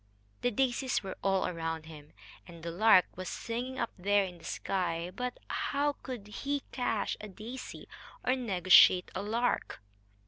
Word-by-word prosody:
The 245 - +2
daisies 255 +1 0
were 190 - -5
all 195 -1 +2
around 165 -2 -3
him, 150 -2 -12 0.3
and 170 -1 -12
the 170 - -3
lark 185 +1 +6
was 185 0 -5
singing 245 +3 -4
up - - -1
there 200 +2 +3
in 180 -2 -9
the - - -18
sky. 175 -2 -2
But 250 +4 -4
how 290 +1 0
could 250 -6 -6
he 280 +7 -3
cash 225 -4 -1
a 215 - -6
daisy 225 +6 -8 0.4
or 255 - +2
negotiate 185 -6 +6
a 185 - -3
lark? 230 +4 -1
205 Hz, 160 wpm, -31 LUFS, 180-245 Hz, 0.4 s, lark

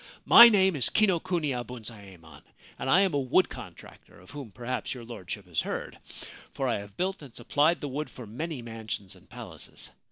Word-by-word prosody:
My 235 0 +11
name 190 -4 +3
is 130 - +3
Kinokuniya 170 - +1
Bunzaemon, 100 -10 -10 0.4
and - - -3
I 185 +7 +6
am 190 -4 +2
a 145 - +1
wood 135 +8 +2
contractor 95 -7 -12
of 90 - -16
whom 140 -5 -8
perhaps 125 +5 -4
your 125 - -9
Lordship 105 -3 -7
has 85 -4 -1
heard, - - -5 0.5
for 135 - -2
I 120 - 0
have 100 0 -12
built 190 0 -2
and 135 -5 -13
supplied 150 +7 +1
the 145 - -3
wood 145 +3 -4
for 125 - -10
many 130 +5 -5
mansions 110 -4 -6
and - - -21
palaces. - - -8
125 Hz, 185 wpm, -28 LUFS, 105-160 Hz, 0.5 s, My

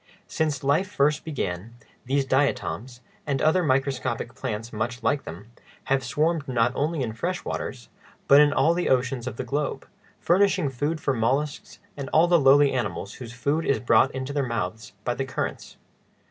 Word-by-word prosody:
Since 150 -4 -2
life 150 +8 +2
first 150 -3 +1
began, 115 - -4 0.3
these 135 +1 +1
diatoms, 130 -2 -1 0.3
and 140 -2 0
other 160 +4 +3
microscopic 130 -5 -1
plants 115 -2 -5
much 120 +3 -3
like 145 -1 +1
them, 95 +8 -9 0.4
have 135 -1 +1
swarmed 150 +4 0
not 120 -2 +2
only 150 +1 -1
in 120 - -2
the 110 - -8
fresh - - -3
waters, - - -5 0.4
but 140 +1 +8
in 150 -1 +5
all 140 +5 +3
the 175 +1 -1
oceans 130 -1 0
of 125 - -4
the - - -3
globe, 145 +4 -3 0.3
furnishing 185 -3 +2
food 145 +5 -2
for 140 -2 0
mollusks 135 +5 -1 0.2
and 140 -2 -6
all 165 +2 +4
the 175 -1 +5
lowly 140 0 +6
animals 100 -5 -3
whose 120 -3 -9
food 140 +7 -1
is 140 - +1
brought 120 +1 +4
into 130 +1 -5
their 145 - +1
mouths 110 -4 -4
by 120 - 0
the 135 - -2
currents. 130 - -5
135 Hz, 175 wpm, -25 LUFS, 120-145 Hz, 0.4 s, but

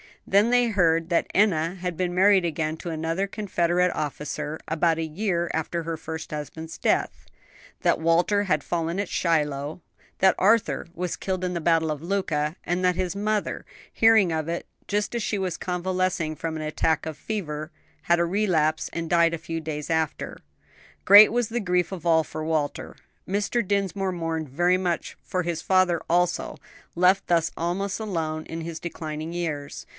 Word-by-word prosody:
Then 205 +4 +4
they 245 0 +4
heard 165 -6 +2
that 170 - +2
Enna 175 -4 +2
had 180 -2 -4
been 180 -1 -1
married 190 -1 +5
again 155 -1 -2
to 175 - -6
another 165 +4 -1
Confederate 180 -3 +1
officer, 150 +1 -4
about 165 +1 +1
a 165 - -1
year 170 +1 -1
after 165 +2 -2
her 165 0 -3
first 160 0 -7
husband's 160 +2 -6
death; - - 0 0.6
that - - +2
Walter 175 +5 +2
had 190 - 0
fallen 170 +1 -2
at 200 - -2
Shiloh, 150 -1 0 0.4
that 190 0 +5
Arthur 195 -8 +2
was 180 0 -2
killed 185 -1 -3
in 180 0 -1
the 170 - -3
battle 160 -1 +2
of 150 -1 -4
Luka, 165 -4 -1
and 175 +2 -1
that 180 -1 +3
his 185 +1 -2
mother, 210 +1 -1 0.3
hearing 220 -5 +5
of 160 -1 -2
it 170 +1 -3 0.2
just 205 +2 -1
as 235 - -1
she 210 - -1
was 185 -3 -2
convalescing 180 -3 -1
from 160 +1 -4
an 155 - -4
attack 155 +1 0
of 160 -2 -5
fever, 155 -7 -4 0.3
had 170 0 +3
a 170 - +3
relapse 170 -5 +1
and 165 -1 -3
died 170 -1 +4
a - - -1
few 165 +1 -4
days 150 -2 -5
after. 160 -2 -1 0.7
Great 205 +2 +9
was 240 -1 0
the 240 +1 -1
grief 180 -4 0
of 180 -3 -7
all 160 -1 +4
for 155 - -6
Walter; 155 -2 -2 0.3
Mr. 205 +3 0
Dinsmore 195 -1 0
mourned 165 -3 -3
very 175 +6 +2
much 180 -2 -2
for 180 -1 -2
his 170 -1 -2
father 185 -3 +3
also, 175 +1 +1 0.4
left 180 +3 +3
thus 165 -2 +2
almost 185 +5 -2
alone 160 -7 -3
in 165 0 -6
his 165 0 -6
declining 160 -1 -5
years. 155 -5 -4
170 Hz, 175 wpm, -25 LUFS, 160-190 Hz, 0.7 s, Great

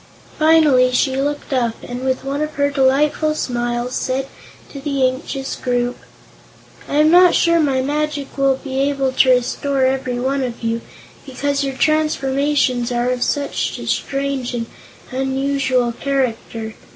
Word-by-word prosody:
Finally 305 -5 +5
she 260 +1 +1
looked 285 +1 -2
up, 235 -3 0
and 245 +1 -6
with 260 0 -1
one 280 +2 -2
of 305 0 -3
her 285 0 +1
delightful 285 +3 +2
smiles, 240 -2 -2
said 260 +1 -1 0.4
to 280 - -9
the 275 -2 +1
anxious 270 +1 -4
group: 245 0 -1 0.9
"I - - -2
am 305 +1 +5
not 360 0 +6
sure 335 -1 +3
my 270 -4 +1
magic 295 0 -2
will 275 -1 +2
be 265 0 -5
able 275 -1 +1
to 260 0 +3
restore 260 +2 +1
every 260 -2 -1
one 270 +2 0
of 240 -2 -4
you, 230 0 -1 0.4
because 280 +1 -2
your 270 -1 -3
transformations 275 -4 +1
are 245 +1 0
of 250 -1 -2
such 285 +2 -1
a - - -7
strange 275 -3 -2
and 230 -1 -2 0.5
unusual 265 -1 0
character. 230 -4 -2
270 Hz, 150 wpm, -19 LUFS, 250-285 Hz, 0.9 s, not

